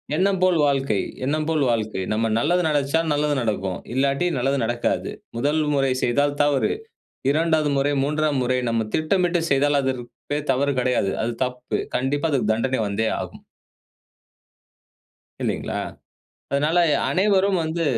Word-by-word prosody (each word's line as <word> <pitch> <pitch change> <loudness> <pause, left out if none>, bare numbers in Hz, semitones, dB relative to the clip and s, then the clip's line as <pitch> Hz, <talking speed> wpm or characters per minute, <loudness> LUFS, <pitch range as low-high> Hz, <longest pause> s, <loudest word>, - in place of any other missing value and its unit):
எண்ணம் 190 +3 +2
போல் 185 -2 +4
வாழ்க்கை, 135 -6 +1 0.3
எண்ணம் 155 +3 0
போல் 155 -3 +1
வாழ்க்கை. 110 -4 -1
நம்ம 115 +1 0
நல்லது 175 +9 +2
நெனைச்சா 145 0 +1
நல்லது 145 0 +1
நடக்கும். 100 -5 -2 0.2
இல்லாட்டி 140 +5 +1
நல்லது 135 +3 +1
நடக்காது. 120 +1 -1 0.3
1 145 +5 +1
முறை 135 -2 +2
செய்தால் 145 +4 +1
தவறு. 145 -2 +2 0.6
2வது 155 -1 +2
முறை, 140 +1 +1
3ஆம் 150 0 0
முறை 125 +1 +1
நம்ம 115 -1 0
திட்டமிட்டு 175 +2 +1
செய்தால், 140 +1 +3
அதற்கு 130 -2 -2 0.3
பெயர் 150 0 -2
தவறு 140 +2 +1
கிடையாது. 125 -6 +1
அது 115 +2 -1
தப்பு, 125 0 -4 0.2
கண்டிப்பா 145 +5 0
அதுக்கு 130 -7 +1
தண்டனை 130 +3 0
வந்தே 110 +2 0
ஆகும். - - -8 2.0
இல்லைங்களா? - - -2 0.8
அதனால 150 +5 +2 0.2
எ - - +3
அனைவரும் 195 -1 +2
வந்து 165 +1 -2
140 Hz, 135 wpm, -23 LUFS, 125-155 Hz, 2.0 s, போல்